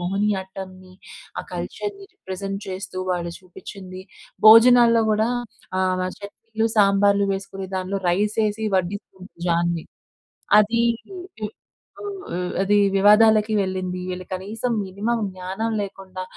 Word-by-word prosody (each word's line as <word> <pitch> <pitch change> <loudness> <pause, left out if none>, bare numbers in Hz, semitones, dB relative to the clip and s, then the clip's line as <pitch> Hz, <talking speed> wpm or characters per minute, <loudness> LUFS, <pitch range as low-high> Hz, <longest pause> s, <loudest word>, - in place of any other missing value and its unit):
మోహినియాట్టంని, 190 -1 -3 0.5
ఆ - - 0
కల్చర్‌ని, 400 -1 -5
రిప్రజెంట్ 195 - -6
చేస్తూ 190 0 -6
వాళ్ళు 175 -1 -2
చూపించింది. 185 0 -10 0.5
భోజనాల్లో 230 +1 +8
కూడా 215 +1 +2 0.5
ఆహ్, 185 -1 +1
చట్నీలు, 220 +2 -4
సాంబార్‌లు 200 0 +4
వేసుకుని 195 0 -5
దాంట్లో 190 +1 -2
రైస్ 205 +5 +1
ఏసి 210 +1 -3
వడ్డిస్తూ, 190 +2 -3 0.3
దాన్ని 170 -1 0 0.7
అది, 225 +3 +3 1.5
ఆహ్, 180 0 -3
అదీ 205 +1 +3 0.2
వివాదాలకి 215 +2 +5
వెళ్ళింది. 185 -1 -3
వీళ్ళు 180 0 -6
కనీసం 215 +6 -3
మినిమమ్ 215 +5 -2
జ్ఞానం 190 +5 -4
లేకుండా, 190 -1 -7
195 Hz, 105 wpm, -23 LUFS, 185-215 Hz, 1.5 s, భోజనాల్లో